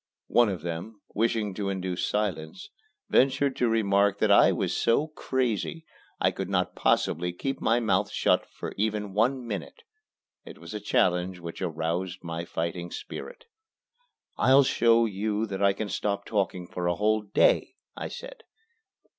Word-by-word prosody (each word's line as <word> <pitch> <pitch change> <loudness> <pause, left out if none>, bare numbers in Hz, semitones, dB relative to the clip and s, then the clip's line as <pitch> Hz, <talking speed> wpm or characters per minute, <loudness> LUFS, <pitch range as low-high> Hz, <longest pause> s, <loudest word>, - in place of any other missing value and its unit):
One 120 -2 +4
of 90 -5 -4
them, 85 +6 -5
wishing 110 -2 0
to 100 0 -3
induce 95 -2 -2
silence, 105 - -3 0.4
ventured 135 +1 +3
to 120 - +2
remark 100 -2 +2
that 105 0 +2
I 100 - +7
was - - -1
so 145 +7 +2
"crazy" 130 - -2 0.3
I - - +3
could 95 -1 -5
not 90 -2 0
possibly 90 +2 +1
keep 135 +10 -4
my 115 +2 +3
mouth 115 - +1
shut - - +2
for - - -7
even 105 -1 -1
one 125 +5 +1
minute. 115 - -6 0.6
It - - -11
was - - -10
a 105 - -3
challenge 90 -2 +1
which 85 0 -8
aroused 85 +2 -2
my 85 0 -4
fighting 85 +1 -3
spirit. - - -8 0.9
"I'll 135 +2 +6
show 115 -2 +4
you 105 +1 -1
that 100 -2 -5
I 100 0 +5
can 100 +2 -4
stop 100 0 -2
talking 95 -4 -1
for 90 0 -4
a 85 - +1
whole 110 +2 +2
day," 100 -1 +2 0.2
I - - -4
said. - - -9
100 Hz, 155 wpm, -27 LUFS, 90-115 Hz, 0.9 s, I